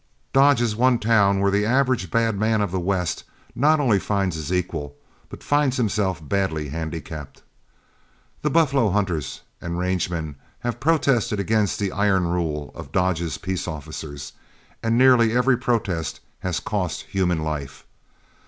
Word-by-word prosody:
Dodge 135 -2 +5
is 110 -3 0
one 125 +2 +3
town 105 -3 +3
where 100 0 +3
the 100 +1 +2
average 125 -4 +1
bad 115 +1 +1
man 110 +2 +1
of 100 -4 -1
the 95 - -1
West 90 -1 -1 0.3
not 150 +5 +3
only 120 -9 +3
finds 95 -4 -1
his 80 +1 -5
equal, 80 -5 -2 0.3
but - - -11
finds 145 -3 +2
himself 100 - -1
badly 80 -6 -1
handicapped. 80 -1 -6 1.0
The 150 - +1
buffalo 140 -7 +3
hunters 95 -7 -1 0.2
and 85 0 -4
range 90 -1 0
men 80 -5 -4 0.2
have 120 -1 -3
protested 135 -9 +2
against 105 +1 +1
the 100 -2 -1
iron 95 -2 +2
rule 80 -4 -2
of - - -10
Dodge's 85 -4 0
peace 95 +1 -3
officers, 75 -2 -7 0.5
and 115 +1 +1
nearly 125 -3 +5
every 125 +1 +4
protest 110 -9 -1 0.2
has 90 -2 -2
cost 95 -3 -3
human 90 -4 +1
life. 75 -3 -5
100 Hz, 150 wpm, -23 LUFS, 85-115 Hz, 1.0 s, Dodge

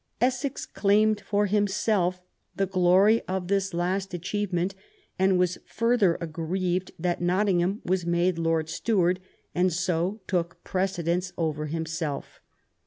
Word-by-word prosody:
Essex 255 +3 0
claimed 210 +1 +2
for 205 +1 +1
himself 195 -2 +1 0.3
the 195 - +1
glory 190 +4 +4
of 185 -1 -3
this 195 -1 +1
last 185 +2 -1
achievement, 185 0 -1 0.5
and 190 0 +4
was 180 0 +1
further 230 -6 +2
aggrieved 175 +3 -2
that 175 +1 -1
Nottingham 185 +1 +1
was 185 0 +1
made 170 0 +1
Lord 165 -1 +1
Steward, 180 +1 +1 0.3
and 180 +1 +2
so 180 +3 -1
took 170 -2 -2
precedence 180 -1 -1
over 155 -2 -1
himself. 160 -2 -4
185 Hz, 120 wpm, -26 LUFS, 175-195 Hz, 0.5 s, glory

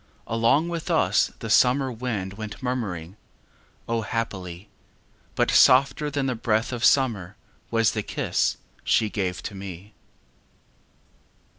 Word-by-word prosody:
Along 115 +8 +2
with 170 -1 -4
us - - +3
the - - -5
summer 130 +1 +4
wind 110 -6 -4
Went 105 0 -7
murmuringâO, 110 0 -6
happily!â 95 -5 -4 0.7
But - - +2
softer 140 +3 +5
than 140 -1 -2
the 130 - 0
breath 115 +1 0
of 120 0 -4
summer 110 -10 +2 0.3
Was 115 -1 +2
the 110 - -2
kiss - - -1 0.3
she 110 -2 +2
gave 90 -3 -3
to - - -5
me. 95 +1 -9
115 Hz, 120 wpm, -25 LUFS, 100-125 Hz, 0.7 s, softer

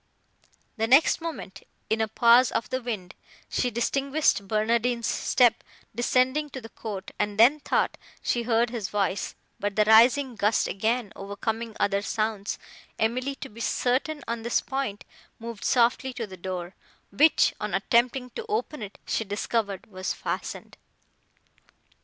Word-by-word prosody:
The 225 0 +1
next 275 +7 +5
moment, 285 - -6 0.3
in 220 0 0
a 220 - +1
pause 235 +3 +5
of - - -2
the 260 - -1
wind, 210 -7 -5 0.4
she 250 - 0
distinguished 265 -2 +1
Barnardine's 230 +3 +1
step 245 +1 +2 0.3
descending 255 +5 +1
to 265 - -7
the 225 -2 -11
court, 205 -5 -7
and 210 -1 -1
then 250 +7 +6
thought - - 0 0.2
she 240 - +1
heard 235 0 +1
his 225 -6 -3
voice; 200 -1 -1 0.2
but, 205 -1 -2
the 215 - +4
rising 240 +4 +5
gust 210 +1 +2
again 220 +1 -1
overcoming 220 +3 -4
other 200 0 +1
sounds, 215 -1 -2 0.4
Emily, 255 +5 0
to - - -8
be 230 +2 -11
certain 265 +5 0
on 230 0 -3
this 235 +1 +1
point, 265 -7 -3 0.3
moved 230 -2 -8
softly 250 +1 +2
to 235 - -4
the 190 -3 -10
door, 180 0 -5 0.4
which, 300 +11 +4
on - - -2
attempting 250 +1 +1
to 465 - -6
open 415 - -2
it, 205 -1 -8
she - - -1
discovered 205 -1 -2
was 185 -3 -4
fastened. - - -5
230 Hz, 145 wpm, -26 LUFS, 210-250 Hz, 0.4 s, then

